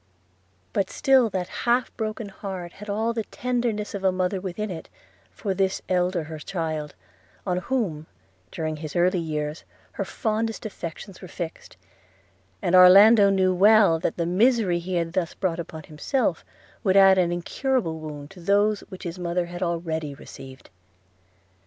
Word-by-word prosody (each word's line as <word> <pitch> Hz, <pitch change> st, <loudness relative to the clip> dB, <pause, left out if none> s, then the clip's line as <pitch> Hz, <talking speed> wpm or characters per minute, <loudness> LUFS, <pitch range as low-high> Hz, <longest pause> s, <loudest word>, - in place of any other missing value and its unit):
But 190 Hz, -, 0 dB
still 265 Hz, -4 st, +3 dB
that 185 Hz, -2 st, -3 dB, 0.2 s
half 245 Hz, +1 st, +2 dB
broken 215 Hz, -1 st, -4 dB
heart 190 Hz, -3 st, -7 dB
had 210 Hz, +1 st, -10 dB
all 220 Hz, +3 st, 0 dB
the 225 Hz, -1 st, -2 dB
tenderness 240 Hz, -4 st, -2 dB
of 200 Hz, -1 st, -5 dB
a 190 Hz, -, +4 dB
mother 185 Hz, +1 st, -1 dB
within 195 Hz, +2 st, -4 dB
it 165 Hz, -, -8 dB, 0.4 s
for 200 Hz, -3 st, -3 dB
this 190 Hz, 0 st, 0 dB
her -, -, 0 dB
eldest 170 Hz, -4 st, -2 dB
child, 160 Hz, -4 st, -3 dB, 0.5 s
on 180 Hz, -2 st, 0 dB
whom, 180 Hz, -8 st, -2 dB, 0.4 s
during 155 Hz, -1 st, -3 dB
his 155 Hz, -1 st, -7 dB
early 180 Hz, +1 st, +3 dB
years, 150 Hz, -1 st, -3 dB, 0.3 s
her -, -, -3 dB
fondest 220 Hz, 0 st, -2 dB
affections 185 Hz, -1 st, -7 dB
were 185 Hz, -, -8 dB
fixed 170 Hz, -2 st, -7 dB, 0.4 s
– 95 Hz, 0 st, -37 dB
and 175 Hz, -, 0 dB
Orlando 200 Hz, +3 st, +8 dB, 0.2 s
well 200 Hz, -2 st, +5 dB
knew -, -, -16 dB
that -, -, -2 dB
the 170 Hz, -, 0 dB
misery 195 Hz, 0 st, +2 dB
he 180 Hz, +2 st, -4 dB
had 170 Hz, -1 st, -1 dB
thus 180 Hz, -3 st, -1 dB
brought 180 Hz, -3 st, -1 dB
upon 160 Hz, -2 st, -7 dB
himself 155 Hz, -, -1 dB, 0.4 s
would 195 Hz, -2 st, +3 dB
add 195 Hz, -1 st, +7 dB
an 175 Hz, -1 st, +2 dB
incurable 175 Hz, 0 st, -1 dB
wound 150 Hz, -2 st, -8 dB
to 190 Hz, -, -13 dB
those 205 Hz, +3 st, +2 dB
which 185 Hz, -, -10 dB
his 175 Hz, +1 st, -6 dB
mother 175 Hz, 0 st, -1 dB
had 175 Hz, +1 st, -8 dB
already 165 Hz, -4 st, -2 dB
received. 135 Hz, -3 st, -12 dB
180 Hz, 160 wpm, -25 LUFS, 165-205 Hz, 0.5 s, Orlando